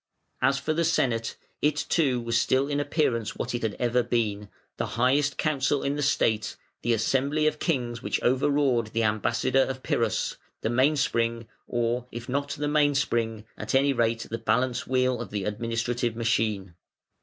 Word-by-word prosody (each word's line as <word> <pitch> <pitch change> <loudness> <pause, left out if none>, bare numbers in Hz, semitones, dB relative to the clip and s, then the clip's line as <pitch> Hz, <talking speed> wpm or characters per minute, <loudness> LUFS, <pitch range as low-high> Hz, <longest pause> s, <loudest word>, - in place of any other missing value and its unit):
As 135 +2 +3
for 155 - -1
the 170 +2 +1
Senate, 120 -8 0 0.3
it 150 0 +2
too 135 -7 +2
was 115 0 -2
still 130 +3 +2
in 145 0 -1
appearance 125 -7 0
what - - -3
it 120 - -2
had 110 -2 -2
ever 125 0 +1
been, 105 -4 -1 0.3
the - - -1
highest 135 +3 +2
Council 145 -2 +1
in 140 +1 0
the 145 - -2
State, 110 -6 +1 0.3
the 120 - 0
assembly 135 +7 +1
of 155 0 +1
kings 120 -7 -1
which - - -1
overawed 130 -3 +2
the 115 0 +1
ambassador 110 +5 +2
of 130 0 -2
Pyrrhus, - - 0 0.2
the 110 - -1
main 130 +5 +3
spring, 115 -4 0 0.2
or, 120 +1 -1
if 120 0 -7
not 140 +2 -1
the 145 +1 -2
main 145 -1 +3
spring, 115 -5 -1
at - - -2
any 140 +1 +4
rate 115 -2 0
the 115 - -3
balance 125 +3 0
wheel, 130 -1 +1
of 120 - -6
the 100 -1 -3
administrative 115 +3 -2
machine. 110 -5 0
120 Hz, 175 wpm, -26 LUFS, 115-140 Hz, 0.3 s, any